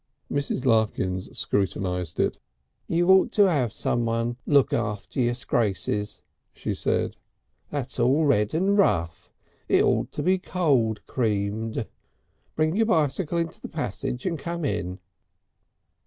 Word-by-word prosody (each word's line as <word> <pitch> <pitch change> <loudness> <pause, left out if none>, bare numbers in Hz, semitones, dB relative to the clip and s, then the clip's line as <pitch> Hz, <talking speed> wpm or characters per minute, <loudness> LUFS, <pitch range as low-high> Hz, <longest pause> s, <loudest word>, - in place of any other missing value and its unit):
Mrs. 140 -2 -1
Larkins 105 -6 +1
scrutinised 90 -3 -1
it. - - +1 0.5
"You 175 +1 +1
ought 190 0 +5
to 205 -2 +5
'ave 135 - +1
someone 115 +1 -1
look 140 -2 +4
after 105 +3 -2
your 120 0 +1
scrases," 105 -4 -1 0.3
she - - -3
said. - - -1 0.5
"That's 135 -3 -4
all 135 +6 +3
red 105 -4 +2
and 195 +4 +2
rough. 85 - +1 0.4
It - - +5
ought - - +1
to 145 - -3
be 185 +3 +3
cold 135 - +1
creamed. 110 -1 -1 0.7
Bring 155 +2 +1
your 225 +1 +2
bicycle 160 - +1
into 165 -1 -3
the - - -7
passage 125 - -4
and 170 -4 -1
come 170 +2 -3
in." 95 -6 -2
125 Hz, 130 wpm, -25 LUFS, 105-160 Hz, 0.7 s, ought